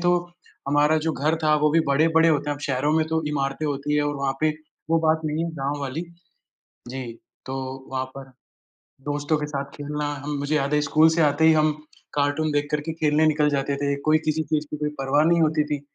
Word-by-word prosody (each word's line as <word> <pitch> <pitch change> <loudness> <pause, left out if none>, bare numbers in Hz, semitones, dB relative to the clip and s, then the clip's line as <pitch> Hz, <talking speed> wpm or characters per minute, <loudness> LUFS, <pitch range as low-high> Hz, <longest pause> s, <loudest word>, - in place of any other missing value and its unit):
तो 175 0 +3 0.5
हमारा 145 +2 +3
जो 160 - +1
घर 155 +4 0
था 155 0 +4
वो 150 - +4
भी 165 +2 +4
बड़े 145 +4 +3
बड़े 165 +1 +5
होते 150 -2 +1
हैं, - - 0
अब - - -14
शहरों 140 +2 0
में 160 -1 +2
तो 160 0 -1
इमारतें 140 +1 -2
होती 145 0 -2
है 150 - +2
और 145 - -2
वहाँ 140 -1 -1
पे 155 0 +3 0.4
वो 165 - +4
बात 160 0 +3
नहीं 155 +2 -1
है 170 - -3
गाँव 140 +2 -2
वाली। 140 +4 -3 0.9
जी। 130 +1 -5 0.4
तो 130 - -4 0.4
वहाँ 130 0 -1
पर 135 -1 -9 0.8
दोस्तों 145 +2 0
के 150 - -3
साथ 140 -2 -3
खेलना 150 0 -4 0.2
हम 145 0 -3
मुझे 145 +2 0
याद 140 0 0
है 150 - +3
स्कूल 155 +2 +4
से 165 +1 +2
आते 150 +1 +2
ही 160 - +7
हम 155 0 +3 0.4
कार्टून 145 +2 +1
देख 145 0 0
कर 150 - 0
के 160 +2 -4
खेलने 155 -1 +2
निकल 150 -1 +3
जाते 140 0 -1
थे, 140 0 0
कोई 155 +2 +3
किसी 155 0 -1
चीज़ 155 -1 -1
की - - -3
कोई 150 0 -2
परवाह 135 +3 +2
नहीं 170 +1 +3
होती 155 -1 +2
थी। 150 -1 -3
150 Hz, 230 wpm, -24 LUFS, 145-155 Hz, 0.9 s, ही